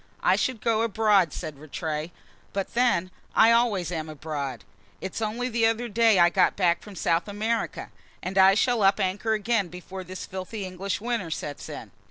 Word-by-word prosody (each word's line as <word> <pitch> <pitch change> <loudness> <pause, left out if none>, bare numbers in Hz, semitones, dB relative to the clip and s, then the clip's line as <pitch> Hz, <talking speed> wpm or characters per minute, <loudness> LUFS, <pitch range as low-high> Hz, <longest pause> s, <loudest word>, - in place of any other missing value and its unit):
"I - - +5
should 255 -4 -1
go 225 -1 +2
abroad," 210 -6 +3
said 145 -1 -7
Rattray. 155 +1 -4 0.4
"But 195 -1 -3
then, 235 -7 +2 0.2
I 225 +1 +7
always 220 -7 +2
am 160 -2 -4
abroad; 140 - -5 0.4
it's 190 +4 -5
only 225 +3 -1
the 230 -2 +2
other 225 +2 0
day 225 -1 +4
I 175 -1 +6
got 185 0 +3
back 175 -3 +2
from 205 -2 -11
South 165 0 0
America, 220 +3 -2 0.3
and 185 +1 -4
I 190 0 +7
shall 240 +1 +2
up 195 +1 +4
anchor 200 +3 0
again 220 -2 +1
before 180 +2 -8
this 185 +1 -7
filthy 190 +2 -6
English 185 +2 -4
winter 230 -6 -2
sets 145 -2 -5
in." - - -8
195 Hz, 180 wpm, -26 LUFS, 175-225 Hz, 0.4 s, I